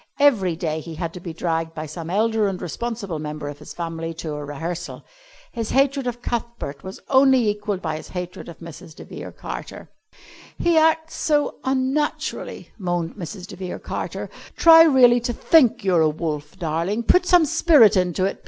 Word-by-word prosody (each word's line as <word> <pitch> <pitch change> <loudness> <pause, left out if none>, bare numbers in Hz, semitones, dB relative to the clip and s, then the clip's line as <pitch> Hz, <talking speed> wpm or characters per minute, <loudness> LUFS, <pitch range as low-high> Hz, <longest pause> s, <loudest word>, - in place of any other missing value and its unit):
Every 210 - +3
day 160 -2 -2
he 160 +1 -8
had 165 0 -4
to 180 - -8
be 175 -1 -7
dragged 165 0 -2
by 155 - -5
some 160 +2 -7
elder 215 +2 +1
and 190 -2 -3
responsible 200 -2 -4
member 150 -1 -5
of 145 - -9
his - - -11
family 165 -1 -5
to 160 -2 -5
a 150 0 -5
rehearsal. 160 +4 -6 0.5
His 230 -2 -4
hatred 275 -1 +2
of 240 0 -5
Cuthbert 235 -12 -4
was 190 +1 -8
only 265 -3 +4
equalled 205 -2 -2
by 155 -2 -2
his - - -10
hatred 180 -1 -7
of 170 - -10
Mrs. 165 0 -11
de - - -10
Vere - - -8
Carter. - - -8 0.7
"He 340 -1 +2
acts 320 0 +3
so 295 -2 0
unnaturally," 265 +3 -2
moaned 175 -3 -2
Mrs. 180 0 -7
de - - -10
Vere 185 -1 -6
Carter. - - -5 0.2
"Try 325 -1 +8
really 255 -6 +6
to 240 0 -3
think 245 -5 +3
you're 180 -4 +3
a 155 - +4
wolf, 150 +1 -4
darling. 170 +6 -2
Put 360 +9 +3
some 355 -3 +6
spirit 295 - +5
into 180 0 +1
it. 195 - -3
190 Hz, 180 wpm, -22 LUFS, 165-250 Hz, 0.7 s, Try